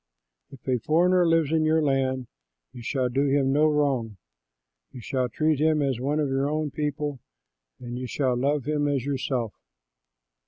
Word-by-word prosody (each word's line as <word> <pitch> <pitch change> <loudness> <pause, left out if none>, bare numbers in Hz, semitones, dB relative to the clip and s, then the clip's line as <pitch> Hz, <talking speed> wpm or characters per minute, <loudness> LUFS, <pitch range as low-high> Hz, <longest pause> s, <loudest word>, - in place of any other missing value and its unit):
If 135 -2 -15
a 125 -2 +1
foreigner 175 +7 +3
lives 165 -3 +2
in 160 -1 +2
your 155 0 +2
land, 130 -2 0 0.5
you 120 - -9
shall 130 +1 -1
do 135 +3 0
him 135 -1 +2
no 150 +2 +4
wrong. 135 -8 0 0.7
You 125 - -10
shall 125 +2 -2
treat 155 +4 +1
him 155 -1 +2
as 135 -4 -1
one 145 +4 -1
of 150 - +1
your 135 +1 0
own 155 -1 -2
people 145 -2 -3 0.6
and 120 0 -6
you 130 - -4
shall 130 -1 0
love 140 +2 0
him 150 0 0
as 140 -3 -1
yourself. 130 -5 -2
140 Hz, 170 wpm, -26 LUFS, 130-150 Hz, 0.7 s, no